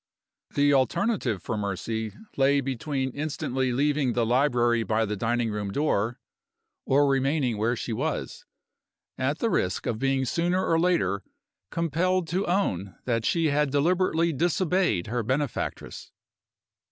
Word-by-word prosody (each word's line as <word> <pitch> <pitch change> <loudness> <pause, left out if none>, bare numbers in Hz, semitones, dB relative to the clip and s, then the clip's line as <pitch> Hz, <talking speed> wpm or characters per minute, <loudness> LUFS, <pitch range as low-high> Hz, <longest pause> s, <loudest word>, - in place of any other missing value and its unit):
The 145 0 +4
alternative 135 - +1
for - - -3
Mercy 105 +2 -3 0.2
lay 140 +1 +3
between 135 0 -2
instantly 130 -3 -2
leaving 140 0 +1
the 120 -1 +1
library 120 -1 +2
by 110 0 +1
the 105 0 -3
dining 115 +2 0
room 105 -1 -3
door 120 -2 0 0.7
or 140 +2 +4
remaining 135 -4 +1
where 115 +3 +1
she 120 - -4
was, 145 +7 -3 0.8
at 135 +4 0
the 230 - 0
risk 90 +1 0
of 110 - -2
being 135 0 +1
sooner 175 +7 0
or 165 - +2
later 100 - +1 0.5
compelled 170 +2 0
to 185 +4 -1
own 100 - -1
that 115 -2 0
she 165 -2 +2
had 145 0 +2
deliberately 165 +3 +2
disobeyed 175 - +1
her 120 +2 -2
benefactress. 130 +4 -3
135 Hz, 135 wpm, -26 LUFS, 115-160 Hz, 0.8 s, The